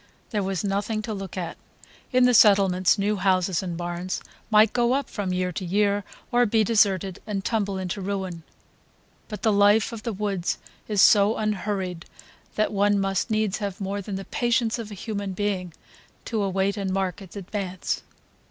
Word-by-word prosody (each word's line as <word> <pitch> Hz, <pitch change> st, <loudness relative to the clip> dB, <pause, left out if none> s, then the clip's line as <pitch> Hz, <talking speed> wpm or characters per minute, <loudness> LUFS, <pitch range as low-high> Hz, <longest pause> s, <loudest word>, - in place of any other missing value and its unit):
There 210 Hz, -3 st, 0 dB
was 190 Hz, -3 st, -2 dB
nothing 205 Hz, +2 st, -1 dB
to 220 Hz, -1 st, -4 dB
look 195 Hz, -2 st, -6 dB
at; 175 Hz, -3 st, -4 dB, 0.5 s
in 255 Hz, -1 st, +5 dB
the 250 Hz, -, +4 dB
settlements 195 Hz, -4 st, +5 dB
new 205 Hz, +1 st, 0 dB
houses 185 Hz, -2 st, +1 dB
and 175 Hz, -3 st, -4 dB
barns 175 Hz, +1 st, -3 dB, 0.3 s
might 215 Hz, 0 st, +5 dB
go 240 Hz, 0 st, +2 dB
up 275 Hz, +1 st, -1 dB
from 200 Hz, -3 st, -3 dB
year 180 Hz, 0 st, 0 dB
to 190 Hz, +3 st, -5 dB
year, 200 Hz, +2 st, +1 dB, 0.3 s
or 245 Hz, 0 st, +4 dB
be 220 Hz, +1 st, +3 dB
deserted 200 Hz, -4 st, +2 dB
and 195 Hz, -3 st, -3 dB
tumble 200 Hz, -4 st, 0 dB
into 190 Hz, +1 st, -4 dB
ruin; 190 Hz, -3 st, -3 dB, 0.9 s
but 210 Hz, -, -7 dB
the 220 Hz, -, +3 dB
life 205 Hz, +3 st, +4 dB
of 230 Hz, -2 st, -7 dB
the 230 Hz, -, -3 dB
woods 195 Hz, -3 st, -2 dB, 0.3 s
is 210 Hz, -3 st, +3 dB
so 205 Hz, +1 st, +5 dB
unhurried 195 Hz, -4 st, -2 dB, 0.5 s
that 215 Hz, 0 st, +1 dB
one 205 Hz, 0 st, +3 dB
must 195 Hz, +2 st, 0 dB
needs 215 Hz, -3 st, 0 dB
have 200 Hz, -2 st, -4 dB
more 200 Hz, +1 st, -3 dB
than 200 Hz, 0 st, -5 dB
the 195 Hz, 0 st, -5 dB
patience 235 Hz, -1 st, 0 dB
of 225 Hz, -2 st, -6 dB
a 205 Hz, -, -8 dB
human 200 Hz, -1 st, -4 dB
being 185 Hz, -2 st, -2 dB, 0.5 s
to 225 Hz, -3 st, -1 dB
await 195 Hz, +1 st, 0 dB
and 195 Hz, -2 st, -2 dB
mark 190 Hz, 0 st, -1 dB
its 190 Hz, -1 st, -12 dB
advance. 190 Hz, -2 st, -3 dB
200 Hz, 180 wpm, -25 LUFS, 190-215 Hz, 0.9 s, in